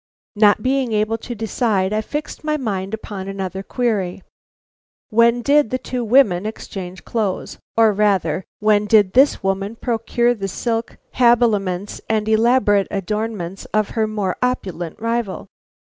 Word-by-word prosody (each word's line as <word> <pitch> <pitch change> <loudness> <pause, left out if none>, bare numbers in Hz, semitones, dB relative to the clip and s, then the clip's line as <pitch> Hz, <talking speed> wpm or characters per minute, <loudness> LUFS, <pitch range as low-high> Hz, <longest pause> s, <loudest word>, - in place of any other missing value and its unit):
Not 210 0 +4
being 260 -3 0
able 215 +2 0
to 240 +1 -6
decide, 210 -3 0
I 215 - +1
fixed 295 +8 -6
my 305 0 0
mind 200 -6 -3
upon 200 -3 -7
another 195 -1 -4
query. 195 -5 -2 0.9
When 235 +2 +4
did 290 -2 +3
the 255 - -1
two 250 -1 -4
women 215 -5 +3
exchange 185 -4 -7
clothes, 210 -5 -3 0.2
or 225 -2 +5
rather, 190 -5 +1 0.2
when 210 -1 +2
did 205 -4 +4
this 270 -2 +4
woman 195 +3 -1
procure 235 +1 0
the 195 -4 -4
silk 225 +3 -3 0.2
habiliments 210 -6 +2
and 215 -1 0
elaborate 220 -2 +3
adornments 200 -2 -3
of 215 -1 +2
her 220 -1 0
more 205 -4 -2
opulent 185 -10 -2
rival? 230 -3 -2
215 Hz, 140 wpm, -20 LUFS, 195-235 Hz, 0.9 s, or